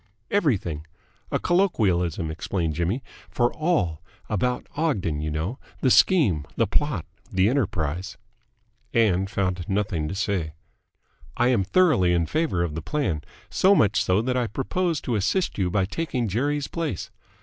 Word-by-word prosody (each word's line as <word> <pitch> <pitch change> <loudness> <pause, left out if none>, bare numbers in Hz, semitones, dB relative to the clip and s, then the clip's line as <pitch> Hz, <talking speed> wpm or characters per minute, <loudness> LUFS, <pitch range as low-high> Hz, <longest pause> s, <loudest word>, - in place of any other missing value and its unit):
"Everything. 95 - 0 0.4
A - - +1
colloquialism," 95 - +1
explained 80 0 -2
Jimmy, 90 - -1 0.3
"for 120 0 +1
'all.' 100 - 0 0.3
About 125 +4 0
Ogden, 100 - 0
you 75 - -2
know. 80 - -3 0.2
The 130 - +3
scheme. 115 - +4
The 115 - +2
plot. 110 - -1 0.3
The 95 0 +3
enterprise." 95 - -1 0.8
Ann 95 -5 +3
found 95 -3 -2
nothing 95 -6 0
to 95 - -4
say. 95 -6 -1 0.8
"I 120 - +3
am 115 -6 +3
thoroughly 100 - +3
in 85 -1 +2
favour 95 - 0
of 85 -3 -2
the 80 - -4
plan. 90 - -1 0.3
So 195 +2 +5
much 105 - +3
so 95 +4 +2
that 125 +1 0
I 125 -2 +1
propose 160 - -1
to 125 - -2
assist 115 - 0
you 90 -2 +1
by 95 +1 +1
taking 125 - -2
Jerry's 140 +8 0
place." 160 - -4
100 Hz, 150 wpm, -25 LUFS, 85-135 Hz, 0.8 s, So